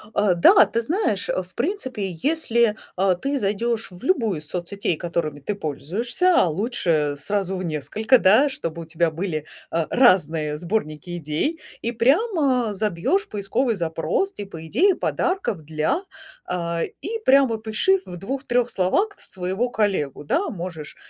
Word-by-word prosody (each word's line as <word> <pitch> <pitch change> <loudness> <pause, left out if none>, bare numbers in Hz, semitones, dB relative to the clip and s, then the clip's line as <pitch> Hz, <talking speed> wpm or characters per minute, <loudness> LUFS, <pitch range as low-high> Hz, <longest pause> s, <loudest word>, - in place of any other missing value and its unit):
А, 205 -4 +3
да, 175 +4 +7
ты 230 +2 -1
знаешь, 265 - 0
а, 185 - 0
в 185 +1 -15
принципе, 260 - -2
если, 235 -8 +2 0.2
а, 190 0 +2
ты 275 +9 -2
зайдёшь 220 +2 -1
в 180 +3 -14
любую 230 - +1
из 150 - -10
соцсетей, 180 +1 -2
которыми 165 -3 -3
ты 200 +8 -3
пользуешься, 225 - 0
а - - +5
лучше 160 - 0
сразу 195 +4 -1
в 185 - -4
несколько, 215 - +2
да, 220 +10 +5
чтобы 170 - -4
у - - -11
тебя 165 +1 0
были, 160 -2 -3 0.3
а, 165 -1 0
разные 160 - +3
сборники 175 -3 -3
идей, 165 - -2 0.2
и 235 - -1
прямо 265 - +2
забьёшь 215 - 0
поисковый 220 - -1
запрос, 165 - -1
типа, 165 -6 -8
"идеи 360 - +4
подарков 355 - -1
для", 155 - -1 0.4
а, 170 -1 -2 0.2
и 450 +5 -3
прямо 265 -3 +5
опиши 220 - +1
в 175 - -8
2-3 245 +3 -1
словах 375 - 0
своего 190 +6 -2
коллегу, 195 - -1
да. 335 - 0
Можешь, 170 -5 -6
200 Hz, 150 wpm, -23 LUFS, 170-250 Hz, 0.4 s, да